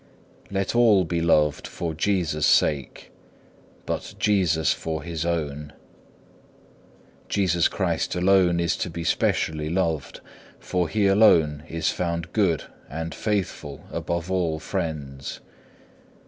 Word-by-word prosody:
4. - - -12
Let 95 -1 -1
all 110 -6 +5
be 85 +1 -1
loved 75 -3 +2
for 85 -2 -4
Jesus' 80 -3 0
sake, 70 -4 +1 0.7
but - - -4
Jesus 90 -7 +2
for 80 -1 -4
His 85 -1 -3
own. 75 -3 -3 1.6
Jesus 90 -4 +2
Christ - - -1
alone 90 -1 +3
is 85 -1 +1
to - - -3
be 85 0 -5
specially 75 -1 0
loved, 80 -4 -1 0.4
for 90 -3 -1
He 105 +3 +1
alone 85 -8 +4
is 80 0 0
found 85 -1 -3
good 95 -8 +2 0.3
and 80 +1 -5
faithful 95 -9 -3
above 85 +1 -3
all 85 -4 0
friends. 70 -4 -4
85 Hz, 120 wpm, -24 LUFS, 80-95 Hz, 1.6 s, all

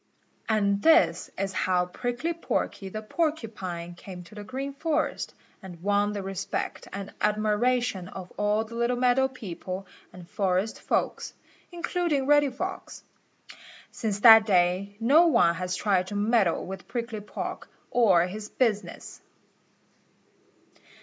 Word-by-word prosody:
And 200 -2 +2
this 325 +1 +4
is 195 -1 -2
how 180 -1 +1
Prickly 245 - -3
Porky 205 -11 -3
the 215 +3 -6
Porcupine 215 - -3
came 180 0 -10
to 170 - -16
the 210 -1 -8
Green 270 +5 -5
Forest, 310 +2 -2 0.3
and 180 -3 -11
won 205 +1 +2
the 200 -2 -4
respect 195 0 -4
and 200 0 -7
admiration 215 -1 +1
of 185 -1 -9
all 210 +1 +1
the 230 - -12
little 235 +1 0
meadow 250 +1 +3
people 195 -6 -7 0.3
and 180 -2 -12
forest 190 +3 -1
folks, - - -1 0.4
including 345 -5 -1
Reddy 290 0 +4
Fox. 365 +9 -6 0.9
Since 210 -3 -3
that 225 -1 +9
day 185 +1 +2
no 290 +9 +5
one 170 - +4
has 180 +1 -3
tried 185 -2 +1
to 205 - -6
meddle 205 -3 +2
with 190 0 -8
Prickly 230 -3 -4
Porky 210 - -6 0.2
or 190 -8 +4
his 210 +3 -7
business. 220 -5 -2
210 Hz, 130 wpm, -27 LUFS, 190-245 Hz, 0.9 s, that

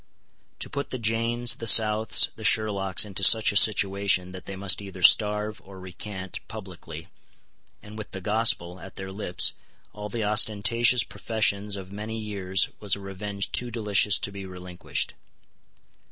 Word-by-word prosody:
To - - -3
put 140 0 -5
the 130 - -4
Janes, 115 +1 +1
the 115 - -4
Souths, 110 +1 +4
the 110 - -11
Sherlocks 100 -2 +3
into 95 -1 -6
such 110 +2 +6
a - - -9
situation 100 -3 +2
that 95 -1 -10
they 95 - -7
must 95 +1 +1
either 95 -2 -9
starve, 105 +1 +3
or 95 -1 -13
recant, 95 0 -8
publicly, 90 -5 -10 0.7
and 105 +1 -11
with 110 - -8
the 95 - -7
Gospel 95 -3 0
at 95 - -12
their 95 0 -7
lips, 95 -3 0 0.4
all 105 0 -8
the 115 +1 -4
ostentatious 110 +3 +3
professions 105 -2 -2
of 95 -1 -9
many 105 +2 -6
years, 100 -3 -1
was 105 -2 -1
a - - -11
revenge 100 +1 -5
too 125 - -3
delicious 105 -3 +2
to 100 - -4
be 100 0 -8
relinquished. 90 -1 -5
100 Hz, 155 wpm, -25 LUFS, 95-110 Hz, 0.7 s, such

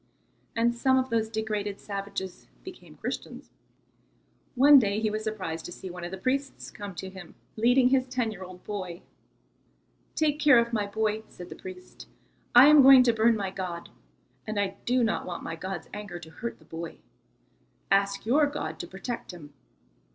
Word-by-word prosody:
And 235 +1 +2
some 260 +2 +2
of 260 -1 0
those 225 -1 +1
degraded 210 -2 -3
savages 195 -2 -6 0.2
became - - -12
Christians. - - -6 1.0
One 280 +2 +8
day 205 -3 0
he 215 -1 0
was 215 +1 -3
surprised 190 -7 -4
to - - -7
see 185 +1 -8
one 180 0 -8
of 175 - -4
the 190 - -6
priests 270 +7 -2
come 205 -3 -8
to 190 +3 -6
him 185 -3 -12 0.2
leading 245 +3 +4
his 260 -1 +2
ten 250 -3 -1
year 195 -3 -8
old 185 0 -11
boy. 185 -4 -6 1.1
"Take 300 -1 +1
care 290 -4 +6
of 235 0 +2
my 210 -2 0
boy," 215 +1 -1
said 180 0 -11
the - - -8
priest. 185 -1 -11 0.5
"I 245 +2 +10
am 300 0 +8
going 265 -1 +9
to 240 -2 +3
burn 225 +1 +3
my 195 -3 -3
god, 180 -3 -5 0.6
and 215 -1 -2
I 200 -1 -1
do 250 0 +2
not 225 - -1
want 175 - -5
my 165 - -5
god's 185 0 -6
anger 205 -3 -6
to 160 -2 -12
hurt 230 +8 -6
the 155 - -22
boy. 165 +1 -7 0.9
Ask 200 +1 +2
your 290 +6 +4
God 160 - -5
to 175 - -5
protect 215 +7 -6
him." 150 -5 -11
210 Hz, 180 wpm, -27 LUFS, 185-240 Hz, 1.1 s, I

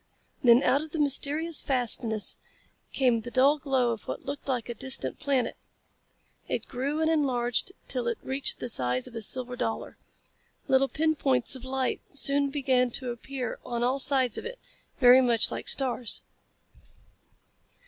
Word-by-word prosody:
Then 240 +1 +6
out 280 - +2
of 315 - -7
the 315 - -5
mysterious 295 +3 +1
fastness 230 -5 +2 0.5
came 245 -4 +1
the 240 - -8
dull 275 +4 +3
glow 260 -4 0
of 225 - -7
what - - -6
looked 280 +1 -6
like 250 -4 -2
a 240 - -4
distant 265 +4 -2
planet. 270 -3 -1 0.9
It - - -3
grew 280 +5 -3
and - - +1
enlarged 255 -1 0 0.2
till 250 -3 -1
it 235 - -1
reached 270 +1 -3
the - - -5
size 125 - 0
of 240 - -10
a 225 - -4
silver 250 +3 -1
dollar. 225 -2 -4 0.7
Little 265 +1 +3
pin 315 +1 +1
points 265 -3 +3
of 255 - -10
light 260 0 -2
soon 280 0 +2
began 260 -3 +1
to 250 +1 -4
appear 250 +1 -6
on 240 -1 -3
all 255 +3 0
sides 265 -4 +2
of - - -10
it, - - -9 0.4
very 250 +1 +7
much 235 -3 +2
like - - -6
stars. 250 -4 +1
260 Hz, 160 wpm, -27 LUFS, 240-280 Hz, 0.9 s, very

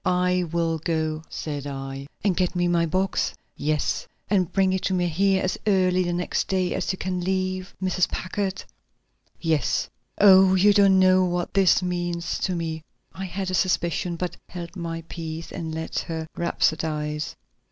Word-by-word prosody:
"I 180 0 +2
will 165 -1 0
go," 155 -1 -1
said 145 -2 -5
I. 135 0 -6 0.2
"And 195 -3 +2
get 180 0 0
me 175 0 +2
my 170 -1 +2
box?" 185 +4 0 0.2
"Yes!" 150 0 -1 0.2
"And 185 -4 +2
bring 190 -1 +2
it 190 - 0
to 190 - +1
me 175 -1 +1
here 190 +3 +2
as 185 - -1
early 185 -2 +3
the 175 -1 0
next 175 +1 -1
day 185 -2 0
as - - -1
you 185 - -5
can 185 -1 -2
leave 185 0 -2
Mrs. 185 -1 +1
Packard?" 195 +1 -3 0.8
"Yes." 160 -5 0 0.3
"Oh, 190 -1 +7
you 205 +2 +5
don't 200 -2 +5
know 185 0 +5
what 175 -1 -2
this 190 -2 +4
means 175 -1 -2
to 185 - -1
me." 160 -1 -3 0.3
I 190 - -5
had 190 +1 -3
a - - -4
suspicion, 175 -1 +1
but 180 +1 -3
held 175 0 -7
my 165 -2 -4
peace 165 -1 -6
and 165 -3 -5
let 160 0 -3
her 160 -1 -4
rhapsodize. 150 -3 -1
180 Hz, 170 wpm, -25 LUFS, 165-185 Hz, 0.8 s, Oh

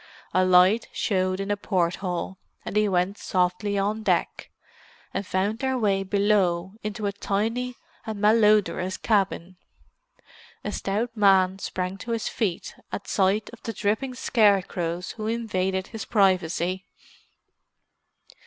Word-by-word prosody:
A 185 - +4
light 185 +5 +5
showed 185 -2 0
in 195 +1 -2
a - - +2
port 180 -4 0
hole, 185 0 -4 0.3
and - - -5
they 210 -1 +3
went 185 +2 0
softly 185 +2 0
on 210 +3 0
deck, - - -1 0.6
and 195 0 -3
found 200 +4 0
their 265 0 0
way 200 -4 +1
below 195 -2 +1
into 210 0 -4
a 200 - +1
tiny 225 +5 -2 0.3
and 220 -2 -5
malodorous 210 -3 +3
cabin. 190 -4 0 1.1
A - - -3
stout 225 +4 -2
man 190 -2 +4
sprang 185 0 -4
to 230 +4 -4
his 230 - -2
feet 195 -7 -2 0.2
at 200 - -5
sight 200 +2 +1
of 235 - -13
the 225 - -5
dripping 220 +6 -1
scarecrows 190 -7 +1
who 215 -1 -5
invaded 190 -5 -1
his 225 -1 -6
privacy. 185 -2 +1
200 Hz, 135 wpm, -25 LUFS, 185-215 Hz, 1.1 s, light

